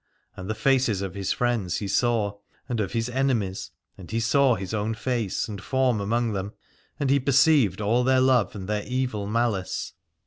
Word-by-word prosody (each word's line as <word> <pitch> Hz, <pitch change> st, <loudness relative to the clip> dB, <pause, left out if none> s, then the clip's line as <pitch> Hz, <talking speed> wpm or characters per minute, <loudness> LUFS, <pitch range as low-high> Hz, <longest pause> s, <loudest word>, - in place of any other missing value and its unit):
And 95 Hz, +2 st, -8 dB
the 110 Hz, -, -1 dB
faces 120 Hz, -4 st, +2 dB
of 95 Hz, -3 st, -5 dB
his 100 Hz, -1 st, -2 dB
friends 120 Hz, -7 st, 0 dB
he 100 Hz, -, -4 dB
saw, 105 Hz, -1 st, 0 dB, 0.3 s
and 120 Hz, -3 st, -2 dB
of 105 Hz, 0 st, -2 dB
his 115 Hz, 0 st, 0 dB
enemies, 120 Hz, -7 st, -1 dB, 0.3 s
and 90 Hz, -, -11 dB
he 115 Hz, -, -1 dB
saw 125 Hz, +3 st, +3 dB
his 95 Hz, +1 st, -6 dB
own 110 Hz, +1 st, -1 dB
face 115 Hz, -4 st, -2 dB
and 100 Hz, -3 st, -7 dB
form 130 Hz, -2 st, +1 dB
among 115 Hz, +3 st, 0 dB
them, 100 Hz, +1 st, -4 dB, 0.5 s
and 140 Hz, -2 st, +1 dB
he 140 Hz, -, +4 dB
perceived 135 Hz, -, +3 dB
all 115 Hz, +4 st, +2 dB
their 130 Hz, +1 st, +3 dB
love 130 Hz, -7 st, +3 dB
and 95 Hz, -2 st, -6 dB
their 105 Hz, 0 st, -1 dB
evil 125 Hz, -6 st, -2 dB
malice. 110 Hz, -4 st, -1 dB
115 Hz, 185 wpm, -25 LUFS, 100-125 Hz, 0.5 s, he